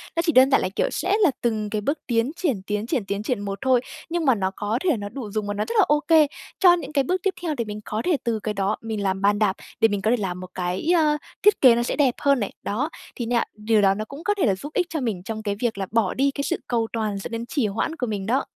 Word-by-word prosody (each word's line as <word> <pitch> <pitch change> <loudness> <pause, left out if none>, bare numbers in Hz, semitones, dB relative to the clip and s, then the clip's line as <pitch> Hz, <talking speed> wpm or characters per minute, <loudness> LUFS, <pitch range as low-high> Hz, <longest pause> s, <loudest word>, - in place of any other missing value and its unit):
nó 335 - +2
chỉ 330 - +3
đơn 260 -1 +6
giản 270 - +5
là, 185 - -1
kiểu, - - +1
sẽ 370 +5 -1
là 345 - +5
từng 215 -3 -1
cái 210 0 -2
bước 285 +8 -1
tiến 235 +1 +1
triển, 285 - -1
tiến 210 +2 -2
triển, 225 - -1
tiến 200 +1 -3
triển 245 -1 -1
một 200 -1 -4
thôi, 260 -2 +3 0.3
nhưng 340 -1 -1
mà 260 -3 +5
nó 190 -2 -1
có 210 +3 -1
thể 335 -9 +2
nó 205 -1 -5
đủ 230 -2 -7
dùng 210 0 -2
và 205 - -1
nó 210 +1 -2
rất 230 - -3
là - - +6
OK 305 +1 +4 0.3
cho 360 -2 +7
những 305 -4 -3
cái 280 -2 +3
bước 365 +7 -1
tiếp 390 - +1
theo 335 -3 -1
để 235 - -1
mình 210 0 -6
có 215 +1 -2
thể 350 -4 +2
từ 230 -3 -1
cái 215 0 -3
đó 195 +1 0
mình 220 -2 -4
làm 190 0 -1
bàn 205 +1 +3
đạp 205 -3 +2 0.2
để 225 - +6
mình 205 -2 -2
có 220 +3 +2
thể 245 - +3
làm 185 -4 -3
một 185 0 -8
cái, 180 - -2
ờ, 305 -3 +3 0.3
thiết 415 - +5
kế 250 -3 +8
nó 240 - +1
sẽ - - -2
đẹp 270 -5 +2
hơn 280 -2 +3
này. 205 - -2
Đó, 255 +10 -1 0.3
thì 240 - -3
nha, 235 0 +1
điều 215 0 +1
đó 195 -1 +4
nó 215 +2 -4
cũng 280 +8 -10
có 415 - +2
thể 370 - +2
là 200 -5 +2
giúp 290 +11 -9
ích 360 -2 +1
cho 320 -2 -2
mình 210 -8 -2
trong 220 +2 -5
cái 205 -1 -1
việc 235 -4 -1
là 195 - -2
bỏ 225 -5 +2
đi 275 +1 +2
cái 280 - -4
sự 285 - -1
cầu 230 -2 0
toàn 215 -3 -1
dẫn 195 - -6
đến 230 0 -4
trì 240 -2 0
hoãn 225 +10 -2
của 250 - -3
mình 205 -3 -3
đó. 255 +6 +1
230 Hz, 305 wpm, -24 LUFS, 205-280 Hz, 0.3 s, kế